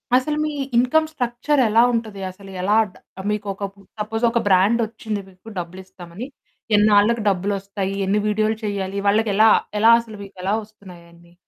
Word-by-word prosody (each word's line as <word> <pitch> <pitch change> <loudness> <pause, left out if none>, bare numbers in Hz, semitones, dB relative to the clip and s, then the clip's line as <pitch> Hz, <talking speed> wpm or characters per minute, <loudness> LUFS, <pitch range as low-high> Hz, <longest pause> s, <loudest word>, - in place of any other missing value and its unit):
అసలు 300 +4 +1
మీ 305 - -2 0.3
income 310 +6 +3
structure 260 +1 0
ఎలా 230 +2 +5
ఉంటది? 215 -4 -3
అసలు 195 +1 -14
ఎలా? 205 +3 +2 0.2
డ - - -28 0.4
మీకు 210 -1 -3
ఒక 200 - -9 0.4
సపోజ్ 225 +2 -3
ఒక 235 - +1
బ్రాండ్ 200 +5 +4
వచ్చింది. 215 -2 -5
మీకు 190 +4 -14
డబ్బులిస్తామని 185 +4 -9 0.5
ఎన్నాళ్లకు 210 +2 +4
డబ్బువస్తాయి? 195 +1 -2
ఎన్ని 205 +1 +1
వీడియోలు 215 +1 0
చేయాలి 200 -1 -3
వాళ్ళకి? 215 +1 +2
ఎలా 220 +1 +6 0.3
ఎలా 225 +2 +6
అసలు 220 -2 -11
మీకు 195 -1 -14
ఎలా 195 +2 0
వస్తున్నాయి 195 -5 -15
అయన్ని? 170 0 -20
210 Hz, 155 wpm, -21 LUFS, 195-225 Hz, 0.5 s, ఎలా